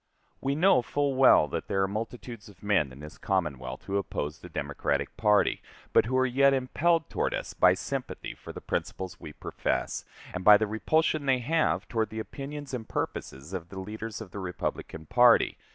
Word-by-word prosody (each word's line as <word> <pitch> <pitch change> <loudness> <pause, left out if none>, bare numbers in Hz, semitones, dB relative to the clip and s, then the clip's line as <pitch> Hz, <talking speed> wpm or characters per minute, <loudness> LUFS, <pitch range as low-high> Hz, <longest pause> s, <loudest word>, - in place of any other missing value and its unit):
We 135 +1 0
know 170 -4 +5
full 145 +2 0
well 130 - +6
that - - -4
there 95 0 +1
are - - +1
multitudes 115 +2 -6
of 95 -1 -18
men 95 -10 +2
in 70 +3 -12
this 75 0 -10
Commonwealth 70 - -2
who 100 0 -2
oppose 80 -5 -3
the 90 - -11
Democratic 70 -3 -2
party, 105 -2 +3 0.3
but - - +5
who 130 +3 0
are 130 - +4
yet 135 +2 +4
impelled 160 +5 +1
toward - - -1
us - - -5
by - - +5
sympathy - - -5
for - - -10
the - - -9
principles 90 -2 -4
we 75 - -8
profess, - - -2 0.3
and 90 - -4
by 105 +1 +9
the 110 - 0
repulsion 150 +7 +1
they 130 -1 +4
have 155 +6 0
toward 110 -2 -1
the 110 - -8
opinions 140 +4 -6
and 115 -3 -5
purposes 70 +7 -4
of 90 -2 -5
the 95 - -9
leaders 110 +2 -6
of 100 -5 -9
the 100 - -6
Republican 90 -3 -4
party. 120 +3 +5
110 Hz, 190 wpm, -28 LUFS, 90-130 Hz, 0.3 s, by